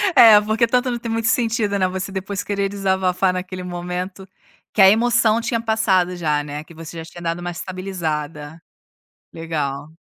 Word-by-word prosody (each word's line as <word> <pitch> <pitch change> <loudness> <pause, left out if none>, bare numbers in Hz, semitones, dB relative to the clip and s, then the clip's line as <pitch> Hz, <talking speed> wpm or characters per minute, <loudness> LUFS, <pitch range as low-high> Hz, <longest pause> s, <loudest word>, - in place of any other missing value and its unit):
É, 220 -3 +9
porque 220 +2 +1
tanto 250 +2 +1
não 240 - -3
tem 230 -1 -5
muito 225 0 0
sentido, 225 -3 +1
né, 185 - +3
você 190 +1 -4
depois 190 0 -4
querer 200 -1 -1
desabafar 190 -2 +1
naquele 185 0 -5
momento, 180 +2 -5 0.5
que 205 - +3
a 190 - +9
emoção 230 +1 +3
tinha 230 0 -1
passado 200 -6 +1
já, 150 -4 0
né, 150 +1 -6
que 170 - -16
você 165 +1 -9
já 165 - -6
tinha 175 +1 -12
dado 170 0 -2
uma 175 0 -4
estabilizada. 165 -4 -5 0.7
Legal. 155 -2 -4
185 Hz, 175 wpm, -21 LUFS, 170-215 Hz, 0.7 s, É